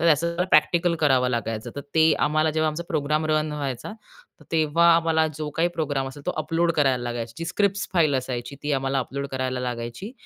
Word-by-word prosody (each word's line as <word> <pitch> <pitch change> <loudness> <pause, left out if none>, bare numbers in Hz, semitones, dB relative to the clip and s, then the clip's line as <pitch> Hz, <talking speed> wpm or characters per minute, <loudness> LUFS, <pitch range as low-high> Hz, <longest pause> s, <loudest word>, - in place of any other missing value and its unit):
तर 165 -1 +5
त्या 170 +3 -1
प्रॅक्टिकल 170 +3 +4
करावं 130 -4 +3
लागायचं. 115 -1 -3
तर - - -3
ते 160 0 +5 0.2
आम्हाला 155 +1 +2
जेव्हा 155 0 +1
आमचा 160 +3 -5
प्रोग्राम 155 0 0
रन 155 0 0
व्हायचा, 140 - -4 0.5
तर - - -16
तेव्हा 165 +1 +3
आम्हाला 160 -1 +2
जो 155 -1 -3
काही 170 +1 +3
प्रोग्राम 145 -4 -1
असेल, 140 +2 -11
तो - - +2
अपलोड 165 +2 +1
करायला 135 -5 +2
लागायचा, 120 -1 -4
जी 165 - -3
स्क्रिप्ट्स 200 +3 0
फाइल 160 -6 +3
असायची, 130 +1 -4
ती 145 0 -1
आम्हाला 135 0 0
अपलोड 140 +2 -3
करायला 130 -1 -2
लागायची. 120 - -5
150 Hz, 195 wpm, -24 LUFS, 130-165 Hz, 0.5 s, तर